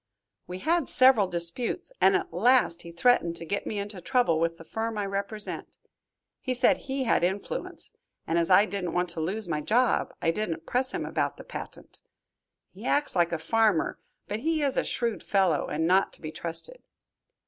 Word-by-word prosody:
We 180 - -6
had 330 - 0
several 255 -5 +5
disputes, 175 - -2
and 390 - +6
at 385 -2 -2
last 245 -7 +3
he 170 - -10
threatened 170 -2 +2
to 165 - -1
get 200 +4 -3
me 210 - -3
into 200 -2 -5
trouble 240 - +2
with 165 0 0
the 165 - -11
firm 220 +5 -3
I 205 - -1
represent. 200 +2 -4 0.6
He 255 -1 -2
said 250 +1 +4
he 270 -1 -3
had 230 - +2
influence, 195 - -3 0.3
and 165 +1 +1
as 170 - 0
I 190 +3 +7
didn't 195 -5 -4
want 180 0 0
to 170 - -4
lose 200 +6 -2
my 155 -3 -1
job, 240 +9 +2
I 165 - +2
didn't 165 -4 -3
press 255 +1 0
him - - -3
about - - -1
the - - -10
patent. - - -8 0.7
He - - -13
acts 290 -6 +1
like 175 -1 +3
a 170 - 0
farmer, 205 +1 +1 0.3
but 210 - -3
he 315 +3 0
is 275 -2 +1
a - - +2
shrewd 235 -2 -1
fellow, 190 -6 +1
and 160 +2 -1
not 185 +3 +3
to - - -12
be 155 - -5
trusted." 170 - -5
200 Hz, 190 wpm, -27 LUFS, 170-245 Hz, 0.7 s, I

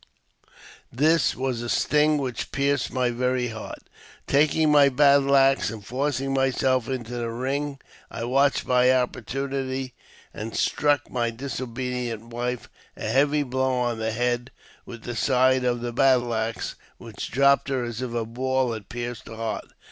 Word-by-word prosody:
This 155 +6 +3
was 130 -2 -2
a 120 - -5
sting 150 +3 +3
which 130 -5 -4
pierced 140 -1 0
my 125 -1 0
very 125 0 0
heart. 110 -1 -8 0.4
Taking 150 +2 +3
my 145 -1 +6
battle 140 0 +4
axe, 135 -2 +4
and 105 -2 -8
forcing 135 +2 -1
myself 130 -2 +1
into 125 -2 -4
the 120 -1 -3
ring, 135 +4 -2 0.3
I 115 - -6
watched 135 +4 +2
my 125 0 +4
opportunity, 130 +1 -2 0.4
and 110 +1 -6
struck 145 -1 +1
my 120 -2 0
disobedient 125 -2 -4
wife 120 +1 -3 0.3
a - - -6
heavy 145 +2 +3
blow 130 0 0
on 120 -2 -1
the 110 0 -1
head 120 +2 -1 0.4
with 115 -2 -9
the 120 - -5
side 130 +2 +3
of 120 -1 0
my 120 - -2
battle 125 -1 +3
axe, 110 0 -2 0.2
which - - -7
dropped 140 +2 +3
her 130 -2 0
as 120 0 -5
if 130 -2 -3
a 115 -1 -1
ball 130 +1 -1
had 105 -3 -8
pierced 120 -1 -6
her 115 - -8
heart. 110 -1 -4
125 Hz, 155 wpm, -25 LUFS, 120-135 Hz, 0.4 s, my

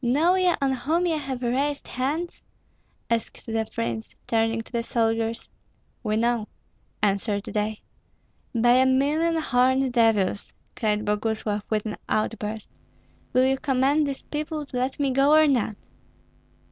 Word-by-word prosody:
"Know 295 +9 +3
ye 370 -1 +3
on 275 -1 +1
whom 315 +7 0
ye 335 -2 +1
have 265 -4 -4
raised 280 +4 -1
hands?" 300 +7 -3 0.7
asked 230 -1 -2
the 225 -1 -1
prince, 115 -1 -4
turning 225 0 +1
to - - -14
the 235 -2 0
soldiers. 225 -1 -1 0.5
"We 215 -2 -1
know," 230 -1 +1 0.6
answered 200 0 +1
they. 215 0 -3 0.7
"By 240 +2 +5
a 260 0 +5
million 295 +6 +2
horned 260 -3 +2
devils!" 220 -5 +2 0.2
cried 215 -3 0
Boguslav, 210 0 -1
with 215 -1 0
an 215 - -4
outburst. 215 0 -2 0.6
"Will 255 +1 +4
you 265 0 +1
command 275 +2 +2
these 275 -1 -5
people 300 0 -4
to 270 - -10
let 260 +3 -1
me 280 -2 +1
go, 275 +3 +4
or 310 0 +6
not?" 240 -6 +1
245 Hz, 145 wpm, -25 LUFS, 220-280 Hz, 0.7 s, or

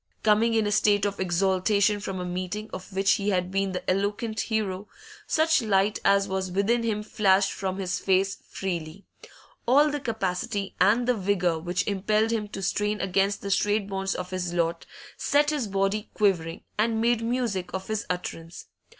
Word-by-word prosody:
Coming 220 +2 +3
in 220 -1 +2
a 205 - 0
state 205 -1 +3
of 200 -1 -2
exaltation 195 +3 +2
from 195 -2 -5
a 180 - -4
meeting 185 +4 -4
of 185 +2 -8
which 195 +1 +2
he 205 0 -1
had 180 -2 0
been 195 0 0
the 180 - -5
eloquent 205 +4 -1
hero, 210 -3 -2 0.4
such 320 -1 +3
light 205 -1 +1
as 200 0 +3
was 190 -1 -2
within 200 +6 +1
him 215 -2 -1
flashed 195 -2 +2
from 190 -1 -3
his 185 -2 -2
face 195 0 +1
freely; 175 -1 -5 0.6
all 290 +5 +5
the 295 - -2
capacity 205 -4 -2
and 225 +6 +4
the 250 - +4
vigour 185 -5 0
which 175 +3 -2
impelled 215 +2 +1
him 220 -2 -1
to 195 -1 -7
strain 210 +2 0
against 195 +1 0
the 200 - -3
strait 205 +1 +1
bonds 195 -1 -2
of 180 0 -5
his 180 -2 -3
lot 170 -1 -1 0.3
set 290 +1 +2
his 285 -7 -1
body 195 +2 -1
quivering 175 -6 0 0.2
and 225 +1 +2
made 235 0 +2
music 230 -7 -2
of 190 0 -5
his 215 -1 -3
utterance. 175 -2 -5
200 Hz, 175 wpm, -26 LUFS, 185-215 Hz, 0.6 s, all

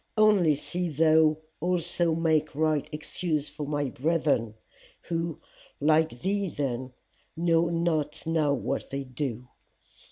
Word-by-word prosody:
Only 205 -8 +5
see 175 +4 -3
thou 155 0 +4 0.2
also 175 -1 +1
make 160 -3 +1
right 155 -1 +1
excuse 155 0 -3
for 150 0 -6
my 145 -2 -1
brethren 145 -7 0 0.5
who, 165 -1 -3 0.4
like 155 -4 +2
thee 200 0 0
then, 130 -4 -3 0.4
know 165 0 +3
not 165 -3 -1
now 160 -3 +2
what 140 - -2
they 140 0 -3
do. 125 -2 -4
155 Hz, 120 wpm, -27 LUFS, 145-170 Hz, 0.5 s, Only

